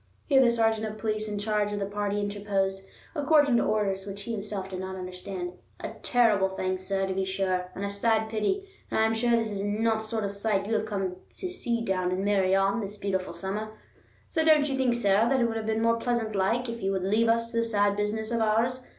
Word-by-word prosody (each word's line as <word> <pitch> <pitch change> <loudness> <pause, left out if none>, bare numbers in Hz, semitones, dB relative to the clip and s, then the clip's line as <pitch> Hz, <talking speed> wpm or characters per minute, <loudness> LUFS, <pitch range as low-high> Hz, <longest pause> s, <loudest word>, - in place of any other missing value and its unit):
Here 270 -3 +5
the 250 - +5
sergeant 225 -2 +1
of 215 0 -6
police 215 0 -2
in 210 -1 -3
charge 210 0 0
of 205 - -2
the 200 - -1
party 205 0 -2
interposed, 200 -1 -1 0.3
according 290 -4 +4
to - - +3
orders, 200 -2 0
which 200 0 -6
he 235 - -5
himself 205 -3 -4
did 185 -1 -6
not 190 0 -5
understand. 180 0 -5 0.3
"A - - -5
terrible 215 -6 +3
thing, 185 0 -2
sir, 195 +1 -1
to 190 - -2
be 190 0 0
sure, 190 -1 -1
and 200 - -3
a - - -2
sad 220 +2 +1
pity; 225 - -1 0.2
and - - 0
I 220 - +5
am 220 - +2
sure 230 +2 0
this 225 -2 -1
is 200 -1 -3
not 220 +2 +1
the 220 - -6
sort 220 0 -2
of 200 - -1
sight 200 -1 0
you 220 - -2
have 215 0 0
come 190 -3 -2 0.2
to 370 - -3
see 235 -10 -2
down 185 -2 0
in 190 +2 -1
Meirion 195 +1 +2
this 205 0 -6
beautiful 190 -3 -2
summer. 205 +5 -4 0.5
So 320 - 0
don't 305 -2 +5
you 275 - -1
think, 255 -3 +2
sir, 215 0 +3
that 265 0 +3
it 240 - +3
would 225 -1 -3
be 220 - +1
more 230 +1 +2
pleasant 230 -2 -1
like, 225 +6 +1
if 230 0 -5
you 195 0 0
would 190 -1 -1
leave 215 +4 +2
us 230 0 +1
to 230 - -3
this 230 0 +1
sad 205 -2 +2
business 215 +2 -2
of 235 - +1
ours? 225 +4 +1
210 Hz, 240 wpm, -28 LUFS, 195-230 Hz, 0.5 s, Here